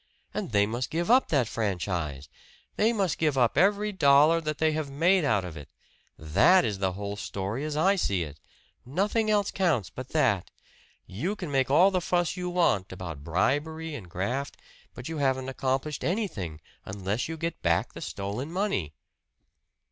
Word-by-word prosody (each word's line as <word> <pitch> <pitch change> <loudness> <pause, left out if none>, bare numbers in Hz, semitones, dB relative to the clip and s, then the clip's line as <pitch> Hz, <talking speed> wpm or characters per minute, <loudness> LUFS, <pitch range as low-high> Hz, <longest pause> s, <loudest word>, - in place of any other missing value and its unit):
And - - -4
they 100 -1 +4
must 120 +4 -3
give 170 +6 0
up 255 +2 +5
that 135 -7 +2
franchise! 90 -10 -3 0.5
They 220 +2 +3
must 195 -7 -1
give 150 -4 +1
up 120 -3 +3
every 205 +6 +3
dollar 155 -1 +5
that 155 -2 -3
they 160 0 +2
have 155 -2 -3
made 170 +6 +3
out 105 -9 +1
of 85 -3 -7
it! 75 -3 -10 0.5
That 80 - +4
is 105 -4 -2
the 95 -1 0
whole 100 +1 -5
story 105 +5 -4
as 150 -1 -3
I 195 +6 +3
see 100 - 0
it 75 -1 -9 0.4
nothing 205 - 0
else 205 -1 +2
counts 165 - 0
but 130 0 -8
that. 120 - +1 0.6
You 165 - -3
can 175 -8 -6
make 135 -2 +1
all 175 +8 +5
the 185 -1 0
fuss 175 0 0
you 180 -1 -3
want 170 - +1
about 85 -6 -7
bribery 145 - -1
and 100 -11 -8
graft, 120 +11 -3 0.4
but 125 - -7
you 160 -2 -4
haven't 130 -1 0
accomplished 135 +2 -2
anything 135 - -2 0.2
unless 100 - -3
you 165 - -4
get 165 +1 -4
back 85 0 +1
the - - -9
stolen 105 +10 -4
money." 170 - -1
135 Hz, 175 wpm, -27 LUFS, -, 0.6 s, up